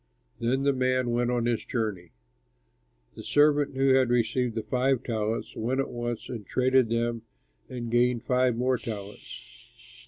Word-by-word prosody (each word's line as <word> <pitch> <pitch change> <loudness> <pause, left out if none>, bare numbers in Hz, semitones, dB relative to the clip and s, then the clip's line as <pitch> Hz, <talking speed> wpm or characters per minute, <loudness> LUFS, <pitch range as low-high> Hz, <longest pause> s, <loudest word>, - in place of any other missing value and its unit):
Then 125 +4 0
the 140 0 +3
man 130 -1 0
went 120 0 +1
on 120 -1 0
his 120 -2 0
journey. 105 -8 -3 1.0
"The - - -10
servant 145 -2 +3
who 135 0 +3
had 130 -2 +4
received 120 0 0
five 130 +2 +1
talents 110 -1 -3
went 125 +4 -1
at 135 - -1
once 120 -1 -4
and 115 -4 -6
traded 130 +3 +2
with 115 - +1
them 115 0 -1 0.5
and 120 -2 -5
gained 120 -1 +2
five 125 -1 +2
more 125 +1 0
talents. 105 -2 -8
120 Hz, 155 wpm, -27 LUFS, 115-130 Hz, 1.0 s, had